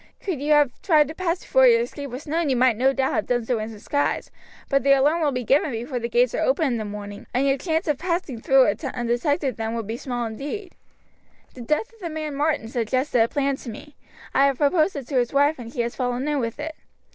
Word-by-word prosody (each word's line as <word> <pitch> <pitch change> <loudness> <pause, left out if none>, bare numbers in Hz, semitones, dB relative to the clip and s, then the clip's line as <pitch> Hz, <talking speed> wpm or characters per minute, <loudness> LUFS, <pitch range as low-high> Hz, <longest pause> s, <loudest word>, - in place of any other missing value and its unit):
Could 350 -9 -4
you 300 +1 +2
have 295 -3 +4
tried 310 -6 +4
to - - -5
pass 355 0 -2
before - - +4
your 465 -1 +5
escape 285 - -5
was 255 +4 -7
known 320 0 0
you 260 - +2
might 250 -1 +4
no 260 +4 +3
doubt 265 -1 0
have - - -1
done 240 -2 0
so 240 -1 0
in 215 +1 -4
disguise, 225 +7 -2 0.4
but 275 -1 +2
the 275 0 +5
alarm 295 +5 +3
will 300 -2 +2
be 250 -1 -3
given 280 +6 +2
before 245 +1 -4
the 235 0 -3
gates - - +2
are - - -1
open 380 -10 +2
in 250 -4 0
the 215 - -4
morning, 205 0 -8
and 265 +2 +2
your 270 - +3
chance 325 0 -1
of 295 -3 0
passing 335 -8 -2
through 270 +1 +5 0.3
undetected 255 +3 0
then 225 0 -3
would 230 -2 -3
be 225 +3 -4
small 245 -2 -3
indeed. 290 - -6 0.8
The 250 - -10
death 305 - -1
of 455 - -21
the 350 -4 -5
man 310 -2 -4
Martin 290 -4 0
suggested 245 +2 0
a 225 - +4
plan 275 +1 0
to 250 - -9
me. 290 +7 -10 0.4
I 275 +1 +5
have 275 -2 0
proposed 310 +5 +2
it 275 -4 -6
to 275 - 0
his 240 +1 -1
wife, 285 +1 +3
and 230 -1 -8
she 245 - -2
has 235 0 -3
fallen 250 +1 -2
in 295 -1 0
with 230 +1 -3
it. 315 +1 -4
275 Hz, 250 wpm, -23 LUFS, 240-310 Hz, 0.8 s, your